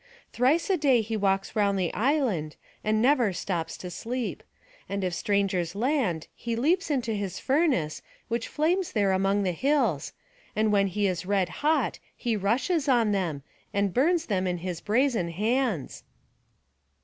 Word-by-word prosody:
Thrice 270 Hz, +8 st, +2 dB
a 375 Hz, -, +3 dB
day 270 Hz, -6 st, +4 dB
he 220 Hz, +1 st, -3 dB
walks 195 Hz, 0 st, 0 dB
round 200 Hz, -2 st, +2 dB
the 180 Hz, -3 st, -1 dB
island, 220 Hz, -, 0 dB, 0.3 s
and 215 Hz, +1 st, +1 dB
never 250 Hz, -6 st, +4 dB
stops 175 Hz, -2 st, -3 dB
to 180 Hz, -, -7 dB
sleep; 240 Hz, +7 st, -4 dB, 0.5 s
and 200 Hz, 0 st, -2 dB
if 180 Hz, -1 st, -1 dB
strangers 195 Hz, -3 st, 0 dB
land 225 Hz, -, 0 dB
he 235 Hz, -1 st, -4 dB
leaps 325 Hz, +10 st, +1 dB
into 245 Hz, -6 st, 0 dB
his 200 Hz, -3 st, -3 dB
furnace, 265 Hz, -, +1 dB, 0.3 s
which 235 Hz, 0 st, -2 dB
flames 345 Hz, +4 st, 0 dB
there 200 Hz, -3 st, +2 dB
among 195 Hz, +2 st, +2 dB
the 185 Hz, -, +1 dB
hills; 240 Hz, -, 0 dB, 0.4 s
and 215 Hz, 0 st, +2 dB
when 200 Hz, -1 st, +3 dB
he 205 Hz, +2 st, -1 dB
is 180 Hz, -2 st, -1 dB
red 195 Hz, -3 st, +1 dB
hot 310 Hz, +2 st, +1 dB, 0.2 s
he 235 Hz, -3 st, -1 dB
rushes 270 Hz, -, 0 dB
on 235 Hz, -5 st, +3 dB
them, 170 Hz, -8 st, -1 dB, 0.3 s
and 200 Hz, -2 st, +1 dB
burns 330 Hz, +6 st, +2 dB
them 190 Hz, -3 st, 0 dB
in 180 Hz, -1 st, -1 dB
his 175 Hz, -1 st, -5 dB
brazen 225 Hz, -5 st, +1 dB
hands." 215 Hz, -, -1 dB
210 Hz, 160 wpm, -27 LUFS, 190-260 Hz, 0.5 s, day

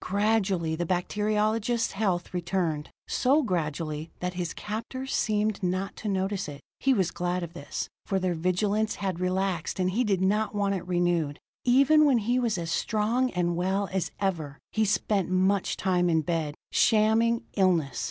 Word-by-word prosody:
Gradually 195 Hz, -5 st, +1 dB
the 170 Hz, +1 st, -2 dB
bacteriologist's 215 Hz, +5 st, 0 dB
health 190 Hz, -4 st, -1 dB
returned 175 Hz, -4 st, -1 dB, 0.2 s
so 280 Hz, +4 st, +3 dB
gradually 155 Hz, -, -2 dB
that 180 Hz, 0 st, -2 dB
his 175 Hz, -2 st, -3 dB
captors 230 Hz, +5 st, -5 dB
seemed 215 Hz, -1 st, 0 dB
not 185 Hz, +2 st, -1 dB
to 220 Hz, -, -6 dB
notice 195 Hz, -1 st, -1 dB
it. 145 Hz, -1 st, -8 dB, 0.2 s
He 270 Hz, -, +2 dB
was 190 Hz, -9 st, +2 dB
glad 180 Hz, 0 st, -2 dB
of 170 Hz, -1 st, -7 dB
this, 170 Hz, -5 st, -5 dB, 0.2 s
for 195 Hz, -, +1 dB
their 185 Hz, -1 st, 0 dB
vigilance 200 Hz, +6 st, 0 dB
had 190 Hz, -3 st, -3 dB
relaxed, 185 Hz, -1 st, -1 dB
and 185 Hz, 0 st, +1 dB
he 235 Hz, +6 st, +1 dB
did 200 Hz, -5 st, +1 dB
not 210 Hz, +3 st, +1 dB
want 200 Hz, -1 st, +1 dB
it 185 Hz, -2 st, -4 dB
renewed. 175 Hz, -5 st, +1 dB, 0.3 s
Even 275 Hz, +5 st, +5 dB
when 275 Hz, -4 st, +4 dB
he 240 Hz, +3 st, +1 dB
was 235 Hz, -5 st, 0 dB
as 165 Hz, -1 st, -3 dB
strong 225 Hz, +8 st, +1 dB
and 175 Hz, -1 st, 0 dB
well 190 Hz, +3 st, 0 dB
as 190 Hz, -2 st, 0 dB
ever, 160 Hz, -8 st, -2 dB
he 220 Hz, 0 st, +1 dB
spent 195 Hz, -2 st, +1 dB
much 190 Hz, +1 st, +1 dB
time 180 Hz, -2 st, +1 dB
in 160 Hz, -1 st, +3 dB
bed, 155 Hz, -2 st, -2 dB, 0.2 s
shamming 225 Hz, +1 st, +3 dB
illness. 170 Hz, -, +2 dB
190 Hz, 165 wpm, -27 LUFS, 175-215 Hz, 0.3 s, Even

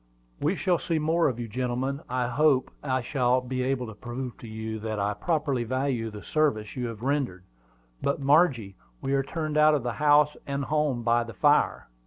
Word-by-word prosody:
"We 160 Hz, +6 st, +1 dB
shall 180 Hz, -2 st, +1 dB
see 165 Hz, -, -1 dB
more 160 Hz, +2 st, +2 dB
of 125 Hz, -4 st, -2 dB
you, 120 Hz, -, -4 dB
gentlemen; 125 Hz, +4 st, -2 dB
and -, -, -18 dB
I 125 Hz, -1 st, 0 dB
hope 135 Hz, +1 st, +2 dB
I 130 Hz, -3 st, -1 dB
shall 125 Hz, -1 st, +2 dB
be 130 Hz, 0 st, -3 dB
able 130 Hz, -1 st, 0 dB
to 110 Hz, -, -8 dB
prove 120 Hz, +3 st, -6 dB
to 115 Hz, -, -10 dB
you 110 Hz, 0 st, -5 dB
that 110 Hz, 0 st, -3 dB
I 100 Hz, +1 st, 0 dB
properly 150 Hz, -4 st, -1 dB
value 130 Hz, -1 st, -1 dB
the 105 Hz, -1 st, -9 dB
service 110 Hz, -10 st, 0 dB
you 125 Hz, -1 st, -2 dB
have 115 Hz, -1 st, -8 dB
rendered. 130 Hz, -10 st, -1 dB, 0.6 s
But, 140 Hz, -, 0 dB
Margie, 135 Hz, -, +3 dB, 0.2 s
we 135 Hz, -, -2 dB
are 135 Hz, -, +3 dB
turned 155 Hz, +2 st, -3 dB
out 150 Hz, 0 st, +6 dB
of 135 Hz, -5 st, -2 dB
house 150 Hz, +4 st, +3 dB
and 140 Hz, -1 st, -2 dB
home 150 Hz, -5 st, 0 dB
by 120 Hz, +1 st, +3 dB
the 115 Hz, -2 st, -10 dB
fire." -, -, +2 dB
130 Hz, 200 wpm, -27 LUFS, 115-150 Hz, 0.6 s, out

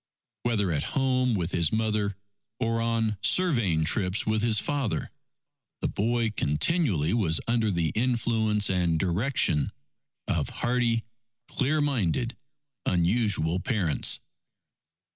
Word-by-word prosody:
Whether 105 Hz, -6 st, 0 dB
at 75 Hz, -3 st, 0 dB, 0.2 s
home 130 Hz, -3 st, +2 dB
with 90 Hz, -2 st, -2 dB
his 85 Hz, -3 st, +1 dB
mother, 110 Hz, -2 st, 0 dB, 0.4 s
or 115 Hz, -1 st, 0 dB
on 115 Hz, -2 st, 0 dB
surveying 115 Hz, -, +3 dB
trips 95 Hz, +3 st, +1 dB
with 110 Hz, 0 st, 0 dB
his 115 Hz, -1 st, +3 dB
father, 140 Hz, -1 st, -1 dB, 0.7 s
the -, -, +1 dB
boy 115 Hz, +1 st, 0 dB
continually 90 Hz, -, +1 dB
was 90 Hz, -9 st, +1 dB
under 115 Hz, -2 st, +1 dB
the 85 Hz, -4 st, 0 dB
influence 110 Hz, -3 st, +1 dB
and 90 Hz, -3 st, +1 dB
direction 90 Hz, -, +1 dB, 0.6 s
of -, -, -1 dB
hardy, 120 Hz, -2 st, 0 dB, 0.4 s
clear 150 Hz, +3 st, 0 dB
minded 120 Hz, -, 0 dB, 0.5 s
unusual 90 Hz, -2 st, +1 dB
parents. 95 Hz, -, +1 dB
110 Hz, 110 wpm, -27 LUFS, 90-120 Hz, 0.7 s, surveying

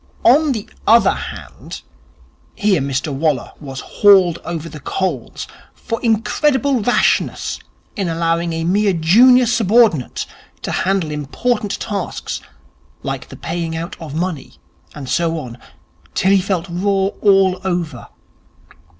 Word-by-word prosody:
On 290 Hz, +5 st, +5 dB
the 220 Hz, -5 st, -4 dB, 0.2 s
other 230 Hz, +2 st, +6 dB
hand! -, -, -8 dB, 0.7 s
Here 205 Hz, -7 st, +2 dB
Mr 140 Hz, +1 st, -2 dB
Waller 145 Hz, -2 st, 0 dB
was 135 Hz, -3 st, -7 dB
hauled 190 Hz, -5 st, +4 dB
over 165 Hz, -2 st, -5 dB
the 155 Hz, -2 st, -9 dB
coals 155 Hz, -4 st, -3 dB, 0.3 s
for 230 Hz, -, -5 dB
Incredible 265 Hz, +4 st, +1 dB
Rashness 245 Hz, +4 st, +1 dB, 0.4 s
in 195 Hz, -4 st, -2 dB
allowing 165 Hz, +1 st, 0 dB
a 165 Hz, 0 st, -2 dB
mere 200 Hz, +3 st, +2 dB
junior 240 Hz, +10 st, +5 dB
subordinate 220 Hz, -, +2 dB, 0.4 s
to -, -, -3 dB
handle 185 Hz, -4 st, 0 dB
important 200 Hz, -, -2 dB
tasks 200 Hz, -4 st, -4 dB, 0.6 s
like -, -, -5 dB
the -, -, -10 dB
paying 165 Hz, 0 st, -4 dB
out 165 Hz, +1 st, -5 dB
of 155 Hz, -3 st, -7 dB
money, 165 Hz, -4 st, -3 dB, 0.4 s
and 145 Hz, -3 st, -7 dB
so 165 Hz, +3 st, 0 dB
on, 125 Hz, -5 st, -7 dB, 0.6 s
till 190 Hz, -, +2 dB
he 195 Hz, -1 st, +4 dB
felt 185 Hz, -2 st, -1 dB
raw 195 Hz, +2 st, 0 dB
all 195 Hz, -2 st, +4 dB
over. 175 Hz, -4 st, -3 dB
180 Hz, 125 wpm, -18 LUFS, 160-210 Hz, 0.7 s, other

